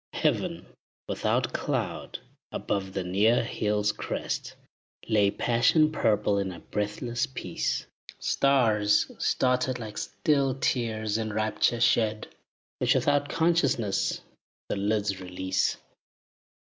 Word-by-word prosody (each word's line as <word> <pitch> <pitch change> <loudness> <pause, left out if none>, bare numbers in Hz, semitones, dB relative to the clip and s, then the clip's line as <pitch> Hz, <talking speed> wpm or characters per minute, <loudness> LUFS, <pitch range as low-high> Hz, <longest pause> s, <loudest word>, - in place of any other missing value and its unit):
Heaven, - - 0 0.4
without - - 0
cloud, - - -2 0.3
above 95 -2 -2
the 95 - -2
near 105 +7 +3
hill's 105 -2 0
crest, - - -4 0.5
Lay 105 -3 +4
passion 125 +9 +3
purple 105 -7 +2
in 95 -1 -2
a 85 - -9
breathless 115 +6 -2
peace. 90 -9 -3 0.3
Stars 110 -7 +2
started 125 0 +1
like 110 -3 -6
still 140 -4 +1
tears, 110 -5 -1
in 110 -1 -2
rapture 110 +2 +1
shed, 110 -2 +2 0.5
Which - - +3
without 145 0 +2
consciousness 145 - +1 0.5
the - - 0
lids 100 -1 0
release. 95 0 -1
110 Hz, 105 wpm, -27 LUFS, 105-125 Hz, 0.5 s, Lay